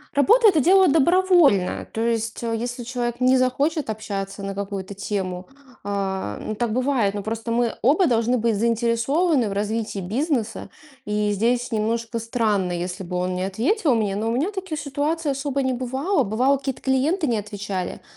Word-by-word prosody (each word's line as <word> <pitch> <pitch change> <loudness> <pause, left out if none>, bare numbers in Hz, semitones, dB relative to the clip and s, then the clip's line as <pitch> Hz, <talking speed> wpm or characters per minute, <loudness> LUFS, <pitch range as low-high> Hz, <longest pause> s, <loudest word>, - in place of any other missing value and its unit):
Работа- 445 +11 +5
это 325 -6 +3
дело 375 +5 +5
добровольное. 325 - +3
То 225 - -5
есть, 230 0 -1
э, 230 -1 -1
если 245 +2 -4
человек 240 0 -3
не 255 +1 +5
захочет 275 +2 0
общаться 200 -2 -5
на 195 0 -4
какую-то 200 -1 -5
тему, 190 -2 -4 0.4
а, 190 - -3
ну 215 - -4
так 230 0 -1
бывает, 255 -5 +1
но 205 - -3
просто 225 +2 -4
мы 235 0 +1
оба 315 - +4
должны 240 +1 +2
быть 230 -1 +1
заинтересованы 235 - +1
в 195 - -3
развитии 210 0 -2
бизнеса, 230 - -2 0.4
и 210 0 0
здесь 240 +4 0
немножко 230 +1 -1
странно, 215 -5 0
если 180 +2 -4
бы 180 0 -6
он 180 0 -1
не 185 - -2
ответил 260 - +1
мне, 205 -3 0
но 220 +2 -1
у - - 0
меня 295 - 0
таких 375 -6 -5
ситуаций 295 +2 -1
особо 275 0 -2
не 260 -1 0
бывало. 265 +7 0
Бывало, 250 +7 +2
какие-то 270 -1 -5
клиенты 295 +6 +1
не 235 -3 +1
отвечали, 205 -3 -5
230 Hz, 170 wpm, -23 LUFS, 205-275 Hz, 0.4 s, Работа